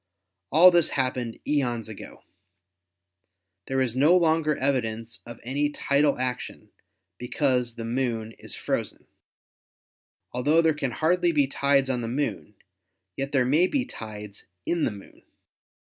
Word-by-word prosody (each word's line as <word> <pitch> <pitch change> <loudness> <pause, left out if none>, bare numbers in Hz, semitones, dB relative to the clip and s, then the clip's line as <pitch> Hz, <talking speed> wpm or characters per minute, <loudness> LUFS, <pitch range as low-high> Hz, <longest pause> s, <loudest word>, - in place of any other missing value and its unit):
All 175 +5 +8
this 175 -2 +3
happened 125 -3 -2
eons 120 -6 0
ago. 110 -2 -11 1.4
There 135 0 0
is 125 -2 -1
no 150 +7 +5
longer 160 -3 +2
evidence 115 -4 -2
of 120 -1 -9
any 140 +4 0
tidal 145 0 +1
action, 125 0 -4 0.5
because 125 -2 0
the 115 - -6
Moon 115 -2 -2
is - - -6
frozen. - - -3 1.3
Altho 150 +7 +3
there 160 -1 +3
can 145 -3 -2
hardly 175 +6 +1
be 145 -3 +3
tides 140 0 +1
on 125 -2 -2
the 115 - -4
Moon, 125 -4 -3 0.6
yet 135 +1 -4
there 135 -4 +2
may 155 +8 +3
be 260 +4 -1
tides 105 - -9 0.2
in 170 -2 0
the - - 0
Moon. 100 -1 -13
135 Hz, 135 wpm, -26 LUFS, 120-150 Hz, 1.4 s, All